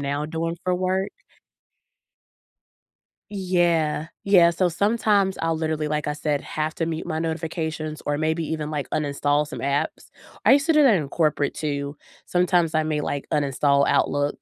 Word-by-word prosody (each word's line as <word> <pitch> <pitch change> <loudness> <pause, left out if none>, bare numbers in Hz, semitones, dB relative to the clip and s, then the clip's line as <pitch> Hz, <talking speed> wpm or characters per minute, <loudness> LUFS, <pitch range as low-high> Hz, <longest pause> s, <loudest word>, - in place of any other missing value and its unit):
now 140 +1 -2
doing 165 +1 -3
for 180 - +1
work. 185 +2 -1 2.2
Yeah, 175 -5 +1 0.2
yeah, 180 -4 +6
so 175 +1 +1
sometimes 200 +1 +1
I'll 165 -1 0
literally, 155 -1 -1
like 150 -1 -2
I 150 - 0
said, 150 -1 -2
have 155 +1 -3
to 165 - -2
mute 165 0 -4
my 160 -2 -2
notifications 160 -1 -3
or 145 0 -1
maybe 160 +1 0
even, 155 -1 -3
like, 145 -2 -3
uninstall 145 0 0
some - - -7
apps. 140 +1 -2 0.3
I - - +7
used 285 +3 +4
to 325 - +3
do 305 - +6
that 250 -7 +6
in 150 -6 -1
corporate 150 -2 0
too, 145 -1 -3 0.3
sometimes 175 -2 +2
I 155 - +3
may, 155 -1 -1
like, 145 -1 -3
uninstall 140 0 +2
Outlook, 145 0 +1
160 Hz, 160 wpm, -24 LUFS, 150-175 Hz, 2.2 s, I